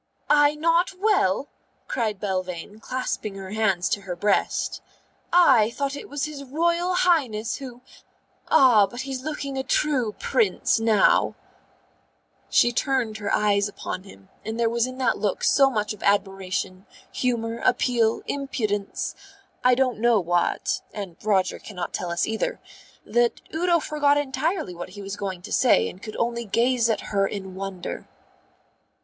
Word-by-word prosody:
"I 295 0 +5
not 335 +4 +2
well?" 375 - +2 0.4
cried 215 -5 -2
Belvane, 185 0 -4
clasping 225 -4 -3
her 190 -1 -8
hands 200 -5 +1
to 200 - -1
her 185 -2 -5
breast. 200 +3 0 0.5
"I 265 -12 +6
thought 280 +3 -3
it - - -9
was 285 0 -3
his 300 -2 -7
Royal 340 +6 0
Highness 255 -12 +1
who 250 -3 -9 0.7
Ah, 230 -7 +6
but 240 +6 -6
he's 265 -1 -5
looking 280 -2 -4
a - - -1
true 260 -5 +1
Prince 440 - +1
now." 220 -3 +3 1.1
She 240 - +4
turned 240 -3 0
her 205 -1 -3
eyes 205 -1 +2
upon 195 -2 -6
him, 100 - -16
and 220 +1 -5
there 230 -1 +2
was 235 +1 +1
in 255 0 -8
that 255 -3 +1
look 205 -3 -1
so 275 -1 +5
much 215 -4 -1
of 210 - -14
admiration, 195 -1 -1 0.2
humour, 230 -2 -1
appeal, 235 -3 +1
impudence 215 -8 -2 0.5
I 250 0 +5
don't 255 -3 0
know 235 -1 +4
what 175 -1 0
(and 195 -5 -6
Roger 195 -3 +1
cannot 180 -5 -6
tell 180 - -3
us, 170 0 0
either) 220 0 -2 0.5
that 240 0 +1
Udo 345 +2 +2
forgot 290 -2 +2
entirely 290 - -1
what 175 +1 -7
he 200 +2 -10
was 195 +1 -5
going 190 -3 -5
to - - -9
say 255 - +4
and 185 - -9
could 215 -1 -8
only 235 0 -1
gaze 235 +2 +2
at 225 - -2
her 195 -1 +3
in 190 -2 -6
wonder. 190 -1 -6
230 Hz, 155 wpm, -24 LUFS, 200-270 Hz, 1.1 s, I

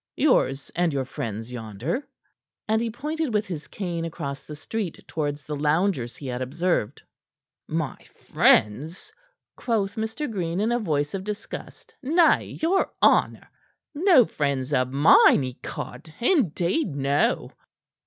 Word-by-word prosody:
yours 135 - +2
and 175 -1 +2
your 135 -2 -1
friends 115 -2 -5
yonder." 120 - -4 0.6
And 220 +1 +2
he 235 - -1
pointed 300 +5 -3
with 210 +1 +1
his 165 -5 -6
cane 175 -4 -4
across 145 -4 -5
the 150 - -9
street 185 +3 -5
towards 145 -2 -3
the 150 +3 -5
loungers 150 -3 0
he 145 - -10
had 125 -1 -3
observed. 145 - -1 0.6
"My 155 -4 -2
friends?" 140 - +1 0.4
quoth 210 -4 -1
Mr. 220 +7 -3
Green, 180 -5 -2
in 220 +3 +1
a 240 - +1
voice 145 -8 -1
of 195 -1 -3
disgust. 210 - -7
"Nay, 320 +5 +3
your 375 +4 +2
honor! - - +3 0.5
No 315 - +5
friends 140 -4 -2
of 130 -1 +1
mine, 140 0 +6
ecod! 130 +5 -7
Indeed, 195 - +1
no!" 140 +1 +1
165 Hz, 135 wpm, -25 LUFS, 140-220 Hz, 0.6 s, mine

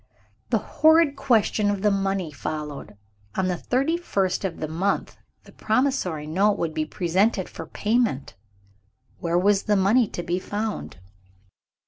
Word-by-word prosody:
The - - +3
horrid 315 -2 +4
question 225 -6 +2
of 200 -1 -2
the 210 - +4
money 195 -4 -1
followed. 150 -6 -6 0.4
On 190 - 0
the 180 - 0
thirty 270 - 0
first 195 - -1
of 185 -4 -3
the 155 - -3
month, 180 +6 -1 0.3
the - - -16
promissory 215 - 0
note 195 +7 +2
would 160 -2 -2
be 155 -1 -1
presented 190 +4 0
for - - -9
payment. 215 - 0 0.9
Where 170 0 0
was 195 +2 +3
the 210 - +2
money 205 +5 +4
to 175 - -6
be 175 +1 -1
found? 210 +2 -4
195 Hz, 145 wpm, -24 LUFS, 170-220 Hz, 0.9 s, horrid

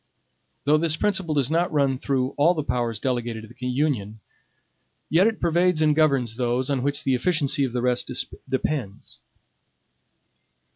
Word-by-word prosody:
Though 150 +2 +3
this 160 -1 +1
principle 190 -6 0
does 140 -1 +1
not 170 +2 +1
run 140 -4 +1
through 130 -3 0
all 165 +5 +3
the 155 - -2
powers 120 -5 -2
delegated 120 -3 -2
to - - -10
the 125 - -6
Union, 125 -6 -1 0.9
yet 180 +6 +5
it 225 -1 -1
pervades 175 0 +2
and 155 -1 +3
governs 135 -7 +2
those 125 +2 0
on 135 -2 0
which 145 +3 -1
the 135 - +1
efficacy 145 0 +1
of 130 - -4
the 125 -1 -1
rest 125 -1 0 0.4
depends. 110 - -3
140 Hz, 155 wpm, -24 LUFS, 125-155 Hz, 0.9 s, yet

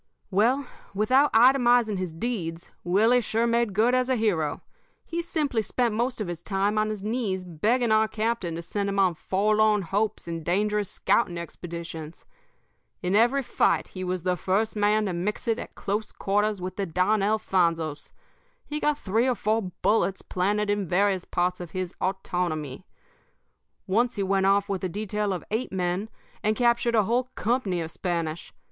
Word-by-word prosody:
"Well, 240 +8 +2 0.3
without 255 +8 +3
itemizing 240 -3 +4
his 185 -2 -3
deeds, 170 -3 -4
Willie 220 +8 +4
sure 225 +1 0
made 235 -3 +1
good 230 +4 +3
as 255 0 +2
a 260 - +3
hero. 175 -10 0 0.4
He 340 0 -3
simply 300 -8 -1
spent 235 +2 0
most 240 +3 -1
of 210 - -2
his 175 -1 -5
time 200 +3 0
on 215 0 +1
his 210 -2 -5
knees 210 -5 -2
begging 220 +8 +1
our 220 0 +4
captain 215 -6 -2
to 170 - -5
send 200 +3 -2
him 200 - -2
on 190 -3 +4
forlorn 210 +4 +2
hopes 205 +4 -1
and 165 -1 -4
dangerous 210 +3 0
scouting 175 -7 +1
expeditions. 170 -2 -7 0.8
In 180 +2 +1
every 240 +6 +4
fight - - +1
he 185 - -6
was 180 -1 -2
the 180 0 +1
first 195 +6 0
man 210 +1 +2
to 190 - -2
mix 195 +8 -3
it 230 +1 +1
at - - -8
close 210 +2 -3
quarters 205 +1 0
with 185 0 -6
the 200 -1 -1
Don 185 +5 +1
Alfonsos. 170 -7 0 0.5
He 300 +1 -4
got 300 -1 +1
three 225 +1 +1
or 255 - +2
four 215 -2 -1
bullets 195 -3 +2
planted 205 +3 0
in 205 -2 -1
various 190 +1 +1
parts 180 +1 -1
of 175 -2 -8
his 185 -2 -3
autonomy. 175 -5 -2 1.0
Once 235 +5 +1
he 200 - -1
went 195 0 +2
off 200 0 +3
with 195 -2 -3
a 185 - -1
detail 210 +2 -2
of 185 - -3
eight 225 +4 -1
men 185 +3 -1 0.3
and 215 0 +1
captured 235 0 +2
a 215 - +4
whole 240 +5 +1
company 210 -7 0
of 160 0 -5
Spanish. 170 -3 -3
205 Hz, 175 wpm, -26 LUFS, 180-225 Hz, 1.0 s, itemizing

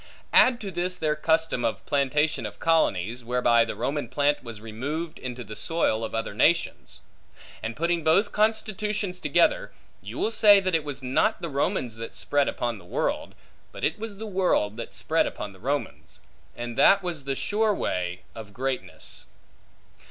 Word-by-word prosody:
Add 250 -2 +6
to 200 -3 -5
this 180 +1 -2
their 155 -2 0
custom 160 -4 +1
of 115 - -2
plantation 150 +2 +1
of - - -11
colonies; 120 - +1
whereby 120 -1 +3
the - - -5
Roman 135 0 -2
plant 145 +2 +1
was 115 -3 -8
removed 140 +10 -5
into 125 -1 -6
the 110 - -9
soil 140 -9 0
of 110 - -4
other 115 - -2
nations. - - +1 0.6
And 115 0 -4
putting 170 0 0
both 195 +7 +3
constitutions 210 -3 0
together, - - +2 0.3
you - - -8
will 225 - 0
say 205 -3 +7
that 185 -1 -1
it 160 -2 +2
was 140 -2 -6
not 135 +12 +1
the 170 - -2
Romans 125 -4 -1
that 115 0 -7
spread 145 -1 +1
upon 120 -3 -2
the - - -15
world, 90 - -2 0.4
but - - -10
it - - 0
was 215 -2 -6
the 220 - -6
world 185 - +1
that - - -6
spread - - +1
upon 100 - -6
the 95 - -17
Romans; 140 +5 -4 0.4
and 120 -1 -5
that 195 0 +6
was 165 -6 -4
the 135 -1 -1
sure 215 +8 +1
way 90 - -2
of 110 -3 -10
greatness. 130 0 -5
145 Hz, 175 wpm, -26 LUFS, 120-180 Hz, 0.6 s, say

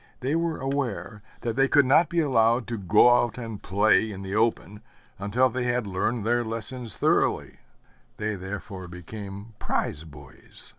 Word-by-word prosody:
They 135 +5 0
were 165 -1 0
aware 130 -6 -3 0.2
that 115 -1 -2
they 135 +1 +3
could 145 0 +4
not 145 +5 +4
be 170 -1 +1
allowed 120 -4 +3
to 115 - -3
go 105 +6 +5
out 120 - -3
and 115 -4 -6
play 110 +3 +2
in 95 -1 -7
the 95 0 -5
open 110 -2 0 0.4
until 105 +6 +2
they 125 0 -3
had 120 -1 0
learned 100 +3 -1
their 120 +1 +2
lessons 115 0 -3
thoroughly; - - +1 0.6
they 110 0 -2
therefore 95 -1 -7
became 100 +4 -9
prize 75 - -2
boys. 70 -4 -9
110 Hz, 160 wpm, -26 LUFS, 100-125 Hz, 0.6 s, go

